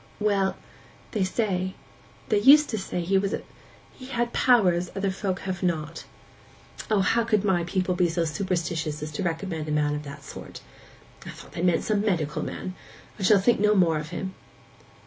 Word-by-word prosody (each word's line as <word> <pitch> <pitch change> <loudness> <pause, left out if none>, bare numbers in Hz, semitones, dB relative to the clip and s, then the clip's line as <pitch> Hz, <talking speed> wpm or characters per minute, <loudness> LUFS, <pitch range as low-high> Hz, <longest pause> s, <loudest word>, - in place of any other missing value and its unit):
'Well—they 200 0 -2
say—they 190 +1 -3
used 285 +6 +7
to 220 - -1
say 185 -2 -3
he 190 +3 +2
was 195 +1 -1
a—he 255 - -11
had 240 -2 -1
powers 180 -8 +3
other 195 0 0
folks 190 -1 -3
have 185 -2 -4
not.' 165 -2 -2 0.8
'O, 210 -3 +3
how 230 +5 +2
could 215 -3 +1
my 180 -3 +2
people 185 +1 0
be 180 -1 +2
so 165 0 0
superstitious 160 -3 -2
as 155 - -5
to 150 - -4
recommend 165 -2 -3
a - - -2
man 150 -1 +1
of 150 - -3
that 140 -1 -10
sort! - - -9 0.6
I - - -9
thought - - -11
they - - -5
meant 175 -2 +2
some 210 -2 +1
medical 175 -8 0
man. 185 - -5 0.5
I - - -6
shall 200 +2 +6
think 230 +4 +3
no 210 +1 +4
more 165 -5 +3
of 150 0 -7
him. 190 +3 -5
185 Hz, 175 wpm, -26 LUFS, 165-205 Hz, 0.8 s, used